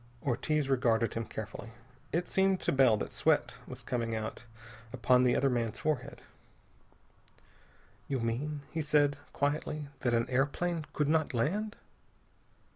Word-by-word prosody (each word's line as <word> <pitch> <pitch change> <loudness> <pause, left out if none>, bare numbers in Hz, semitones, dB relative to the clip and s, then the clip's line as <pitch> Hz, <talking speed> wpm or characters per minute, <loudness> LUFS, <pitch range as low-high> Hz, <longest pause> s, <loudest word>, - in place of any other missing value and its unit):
Ortiz 145 +3 0
regarded 115 -4 +2
him 115 0 -2
carefully. 110 +1 -7 0.4
It 175 +2 0
seemed 190 -1 +2
to - - +1
Bell 130 -5 +5
that - - -4
sweat - - +1
was - - -8
coming 115 -2 -1
out 110 +1 -5 0.5
upon 125 +2 +3
the 125 -1 +4
other 140 - +3
man's 120 -4 0
forehead. 140 -4 -2 1.8
"You 135 -2 -1
mean," 135 +6 -2
he 165 - -1
said 145 -1 +3
quietly, 145 0 -1
"that 120 -3 +1
an 115 +1 +1
airplane 145 +5 0
could 150 - +1
not 155 -3 +1
land?" 205 - 0
135 Hz, 135 wpm, -31 LUFS, 120-150 Hz, 1.8 s, Bell